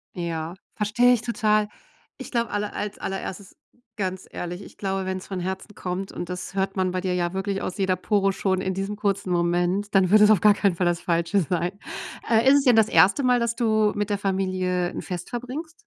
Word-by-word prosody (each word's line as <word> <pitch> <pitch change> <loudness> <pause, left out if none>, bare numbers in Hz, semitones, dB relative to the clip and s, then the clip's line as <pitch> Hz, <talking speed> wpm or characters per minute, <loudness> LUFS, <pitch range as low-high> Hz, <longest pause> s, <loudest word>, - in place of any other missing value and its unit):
Ja, 170 -1 -4 0.2
verstehe 240 +4 +3
ich 230 - 0
total. 215 -3 +1 0.5
Ich 265 - -9
glaube, 235 -1 0
alle 205 0 -2
als 205 0 -4
allererstes 195 0 -5 0.4
ganz 190 -2 -3
ehrlich, 175 +2 -5
ich - - -14
glaube, 195 -1 -2
wenn's 185 0 -4
von 190 -2 -4
Herzen 190 +3 -5
kommt 185 +1 -4
und 175 - -5
das 180 +1 -5
hört 195 0 -1
man 185 -1 0
bei 185 0 -2
dir 185 -1 -1
ja 175 0 -1
wirklich 195 0 -2
aus 185 - -4
jeder 190 -2 +1
Pore 195 +1 +1
schon 190 -1 0
in 190 0 -1
diesem 195 +2 -3
kurzen 200 -3 -1
Moment, 175 +4 0
dann 190 -2 +4
wird 210 +1 +6
es 210 +1 +7
auf 205 - +4
gar 210 -1 +7
keinen 200 -3 +1
Fall 180 - 0
das 175 0 +1
Falsche 170 +3 +1
sein. 175 +3 -2 0.5
Äh, 230 +2 +4
ist 280 - +7
es - - -1
denn 250 -4 +5
das 220 -1 +5
1. 185 - +5
Mal, 250 -1 +4
dass 235 0 -1
du 215 -2 +2
mit 205 0 -1
der 205 - 0
Familie 185 -2 -1
'n - - -6
Fest 180 -3 -6
verbringst? 270 +8 -6
195 Hz, 220 wpm, -24 LUFS, 180-210 Hz, 0.5 s, es